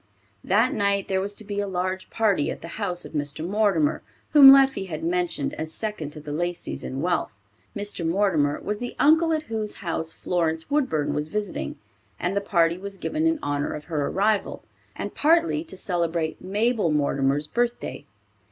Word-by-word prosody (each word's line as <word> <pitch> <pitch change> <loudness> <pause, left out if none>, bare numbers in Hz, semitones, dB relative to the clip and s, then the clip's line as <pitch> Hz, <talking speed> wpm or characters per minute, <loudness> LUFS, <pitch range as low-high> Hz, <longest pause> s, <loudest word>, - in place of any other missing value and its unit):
That 225 +7 +3
night 200 -2 +1
there 190 -1 +1
was 200 +1 -3
to 220 - -3
be 205 -1 -4
a 205 - -1
large 185 0 -3
party 205 -9 +1
at - - -6
the - - -6
house 180 -4 -2
of - - -9
Mr. 150 +1 -2
Mortimer, 195 -6 +2 0.3
whom 280 -3 +10
Leffie 270 -7 +5
had 155 -3 -5
mentioned 175 -4 -1
as 160 0 -3
second 210 -5 -4
to 155 - -8
the 150 0 -8
Laceys 175 +2 -3
in 135 +1 -4
wealth. 175 0 0 0.5
Mr. 205 -3 -2
Mortimer 165 -5 +1
was 210 0 -3
the 245 - -5
uncle 320 +2 +4
at 315 -1 0
whose 220 -6 -4
house 165 -3 -3
Florence 165 0 -1
Woodburn 260 - +1
was 150 +1 -1
visiting, 205 +3 -4 0.4
and 180 +3 -1
the 200 - +1
party 170 -3 +2
was 200 0 -7
given 310 +10 -1
in 325 0 +2
honor 145 0 -1
of 150 - -7
her 150 -3 -2
arrival, 205 +1 0 0.3
and - - -5
partly 330 0 +2
to 320 - -7
celebrate 170 -3 -1
Mabel 210 +1 +1
Mortimer's 140 -1 +1
birthday. 235 -5 -2
190 Hz, 180 wpm, -25 LUFS, 160-215 Hz, 0.5 s, whom